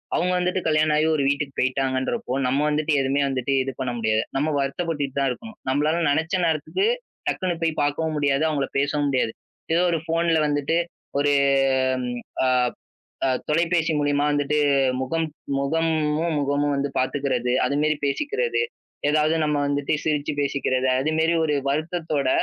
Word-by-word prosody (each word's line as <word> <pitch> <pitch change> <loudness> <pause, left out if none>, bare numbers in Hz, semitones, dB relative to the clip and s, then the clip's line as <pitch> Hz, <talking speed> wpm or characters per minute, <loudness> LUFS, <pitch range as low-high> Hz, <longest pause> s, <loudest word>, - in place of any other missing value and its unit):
அவங்க 180 +2 +1
வந்துட்டு 180 +1 0
கல்யாணம் 155 -1 +3
ஆகி 155 - +3
ஒரு 145 - +1
வீட்டுக்கு 140 -1 -2
போயிட்டாங்கன்றப்போ, 130 - -1
நம்ம 135 +2 +1
வந்துட்டு 150 +1 0
எதுவுமே 135 +2 +1
வந்துட்டு 130 0 -1
இது 135 - -3
பண்ண 130 -2 -1
முடியாது. 110 0 +1
நம்ம 150 +3 +1
வருத்தப்பட்டுக் 145 +2 -2
கிட்டு 135 +1 -4
தான் 135 -1 +2
இருக்கோம். 220 - -8
நம்மளால 150 +5 +1
நெனைச்ச 160 +5 +1
நேரத்துக்கு 160 - 0 0.4
டக்குன்னு 175 -3 -1
போய்ப் 160 -2 0
பார்க்கவும் 155 +2 -1
முடியாது. 145 0 +1
அவங்கள 140 -3 -1
பேசவும் 145 +1 0
முடியாது. 130 -4 +1 0.4
ஏதோ 170 - +3
ஒரு 165 - +1
போன்ல 165 0 +2
வந்துட்டு 145 +2 0 0.4
ஒரு 145 0 +3 2.2
தொலைபேசி 165 +1 +2
மூலமா 145 0 +1
வந்துட்டு 145 +1 0 0.4
முகம், 160 +5 -1 0.3
முகமும் 160 +2 0
முகமும் 145 +1 0
வந்து 140 +1 -1
பாத்துக்கிறது. 130 -2 0
அது 140 - 0
மாரி 155 0 +2
பேசிக்கிறது. 435 - 0 0.5
ஏதாவது 155 +1 +2
நம்ம 150 -1 +1
வந்துட்டு 145 0 -1
சிரிச்சு 150 -2 0
பேசிக்கிறது. 135 -2 0
அது 150 +4 0
மாரி 165 +1 +3
ஒரு 150 -2 +1
வருத்தத்தோட 155 -1 -1
145 Hz, 145 wpm, -23 LUFS, 140-160 Hz, 2.2 s, கல்யாணம்